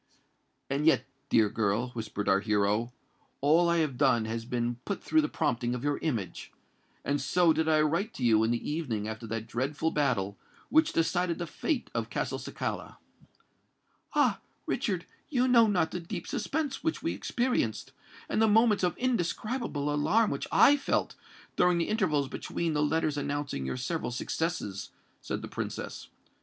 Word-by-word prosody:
"And 140 +3 0
yet, 160 - +4 0.2
dear 110 -2 +5
girl," 110 +3 0
whispered 110 -4 -5
our 95 - +4
hero, 105 +2 +1 0.5
"all 165 +5 +4
I 170 - +3
have 130 -4 -7
done 130 -6 +3
has 115 +1 -4
been 120 0 -1
but 200 - -4
through 315 - +3
the 305 - -1
prompting 120 +1 0
of 125 - -5
your 145 0 0
image; 115 - -3 0.5
and 145 0 0
so 175 -2 +3
did 160 0 +1
I 155 -1 +4
write 170 +8 +1
to 130 - -5
you 110 -2 +5
in 110 - +2
the 120 0 -1
evening 125 -10 -2
after 110 +1 -6
that 115 0 -3
dreadful 140 +8 -1
battle 100 -9 0 0.3
which 315 +1 +4
decided 170 +1 +1
the 175 - -3
fate 275 - -2
of - - -2
Castelcicala." - - -4 1.2
"Ah! - - +3 0.3
Richard, - - -1 0.2
you 255 -3 +2
know 235 -3 +6
not 180 -6 +1
the 180 - -3
deep 170 0 -6
suspense 285 +5 -2
which 320 -1 -1
we - - 0
experienced, 240 - -1 0.4
and - - 0
the 220 - +5
moments 220 -1 +4
of 175 -2 +1
indescribable 220 - -1
alarm 195 +10 +3
which - - -3
I 290 - +6
felt, 280 - 0 0.4
during 180 -1 +4
the 170 - 0
intervals 155 -10 +1
between 165 +4 -3
the 150 - +1
letters 150 0 +1
announcing 145 - -3
your 65 - -3
several 155 +5 -2
successes," 120 - -3 0.3
said - - -4
the - - -5
Princess. - - -5
150 Hz, 165 wpm, -29 LUFS, 120-180 Hz, 1.2 s, know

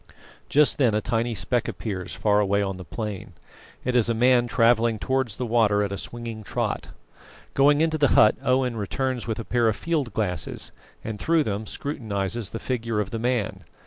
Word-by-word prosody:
Just 150 0 +4
then 120 -6 +3
a - - +3
tiny 115 +1 -1
speck 115 +6 0
appears 95 -5 -5
far 105 -1 +2
away 100 0 +2
on 95 -1 -3
the 95 - -8
plain. 105 +1 -6 0.5
It 125 0 0
is 120 -1 +3
a 115 - +1
man 120 +1 +4
travelling 115 -1 +3
towards 130 -1 -1
the 125 - -3
water 110 -3 +3
at 100 - -3
a 100 - -3
swinging 115 -2 -6
trot. - - -2 0.7
Going 145 +2 +4
into 160 -1 +1
the 145 - +5
hut, 110 - +7
Owen 130 -2 +1
returns 125 +4 -2
with 110 -1 -2
a 115 - -5
pair 120 -2 +2
of 110 - +2
field 150 -6 -1
glasses, 100 -4 -2 0.3
and 110 -2 -5
through 165 +4 +2
them 105 -1 -3
scrutinises 110 -6 -3
the - - -5
figure 115 -2 -2
of 100 -2 -2
the 115 - -3
man. 110 -5 -1
115 Hz, 190 wpm, -25 LUFS, 105-125 Hz, 0.7 s, hut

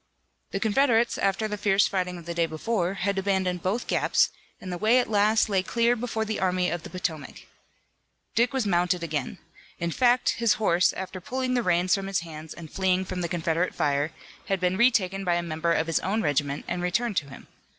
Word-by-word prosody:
The 195 - -3
Confederates, 235 +2 +2
after 195 +2 +1
the 210 -1 -5
fierce 200 -1 +3
fighting 180 -2 -2
of 170 - -11
the 170 - -4
day 170 -1 +1
before, 180 +3 -1
had 200 0 -1
abandoned 190 -2 0
both 205 +8 -1
gaps, - - +2 0.3
and 185 - -7
the 175 - -5
way 220 +4 +4
at 245 -3 +1
last 215 +1 +3
lay 195 -3 +1
clear 235 +5 +1
before 225 -2 -2
the 220 0 -3
Army 180 -1 +1
of 175 - -3
the - - -9
Potomac. 160 -5 -5 0.9
Dick 235 +2 +2
was 265 -4 -1
mounted 180 -2 +1
again. 150 -5 -3 0.4
In 170 0 -2
fact 245 +5 +3
his 230 -2 +4
horse, 185 -4 +3
after 190 0 -6
pulling 255 +5 -2
the 245 - +2
reins 180 -2 +2
from 195 -1 0
his 195 -2 0
hands 160 -2 -9
and 165 -3 -10
fleeing 190 -1 +1
from 185 -1 -4
the 170 - -2
Confederate 170 +1 -1
fire, 145 +2 0 0.4
had 195 -1 0
been 180 +1 +1
retaken 195 -4 +2
by 175 -2 +1
a 175 - -1
member 165 0 -1
of 160 - +2
his 165 -2 +1
own 210 +4 -1
regiment 145 -1 -1
and 175 - -2
returned 200 +4 0
to 140 - -1
him. 135 - -12
185 Hz, 210 wpm, -26 LUFS, 170-215 Hz, 0.9 s, way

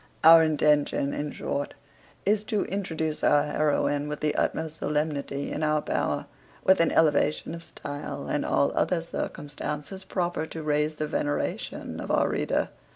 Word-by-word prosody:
Our 165 +1 +10
intention, 150 -2 +2
in 145 0 -3
short, 145 - -3 0.5
is 210 +1 +2
to 210 -3 0
introduce 160 -5 -3
our 145 0 +5
heroine 145 -1 +1
with 150 - -4
the 150 -1 +1
utmost 160 0 -1
solemnity 150 -2 -2
in - - -3
our 155 0 +2
power, - - -1 0.4
with 190 0 +5
an 165 - +3
elevation 150 0 +2
of 170 - -6
stile, 145 -3 -6
and - - 0
all 70 0 +2
other 170 -3 +1
circumstances 150 +3 -5
proper 175 -4 -2
to 160 0 -7
raise 150 +1 +1
the 155 - -2
veneration 145 -1 -3
of - - -6
our - - +3
reader. - - 0
150 Hz, 155 wpm, -27 LUFS, 145-165 Hz, 0.5 s, Our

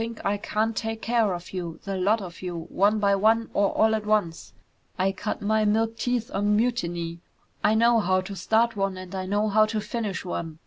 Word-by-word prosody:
"Don't 230 +1 -4
think - - -12
I 205 +1 +1
can't 215 +2 -1
take 225 0 -3
care 230 -3 +2
of 175 0 -6
you, 170 -3 -5
the 195 -1 -3
lot 200 +3 +1
of 175 -2 -9
you, 175 -2 -4
one 205 +3 +2
by 200 -1 +2
one 225 +3 +2
or 200 -1 +3
all 220 0 +3
at 215 -1 -1
once. 210 -6 -1 0.5
I 190 +1 +2
cut 205 +2 -4
my 215 +1 +2
milk 225 +2 +1
teeth 240 0 -2
on 205 +1 +2
mutiny. 175 -8 -1 0.4
I 215 - +4
know 235 +1 +4
how 185 -2 +2
to 195 +2 -7
start 225 +4 +1
one 195 -2 -1
and 185 0 -9
I 185 -1 -3
know 205 +2 +1
how 215 +1 +4
to 215 0 -2
finish 215 -3 -4
one! 165 -3 -4
210 Hz, 220 wpm, -25 LUFS, 185-220 Hz, 0.5 s, I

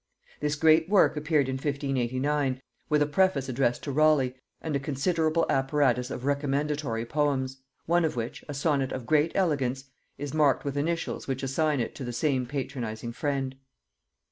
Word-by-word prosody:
This 150 0 0
great 160 +2 +4
work 200 -5 +4
appeared 150 -2 +1
in 130 0 -2
1589, 135 0 -1 0.3
with 150 -1 +4
a - - +1
preface 150 -3 +2
addressed 125 -1 0
to 140 - -3
Raleigh 145 -3 +3 0.3
and 155 -3 -3
a - - +1
considerable 155 +4 +1
apparatus 135 -2 +1
of 125 - -5
recommendatory 140 -4 -1
poems; 135 -1 0 0.3
one 175 +1 +3
of 160 - 0
which, 115 -1 -4
a 145 - -4
sonnet 140 -2 +1
of 130 -2 -5
great 155 +4 +3
elegance, 135 -8 0 0.3
is 145 0 -5
marked 150 -4 +3
with 140 -1 -2
initials 165 +4 -2
which 135 0 -3
assign 145 +2 +1
it 115 - -2
to 140 - -7
the 120 -1 -4
same 130 0 0
patronizing 120 -5 -4
friend. 135 -1 -2
140 Hz, 165 wpm, -27 LUFS, 130-150 Hz, 0.3 s, great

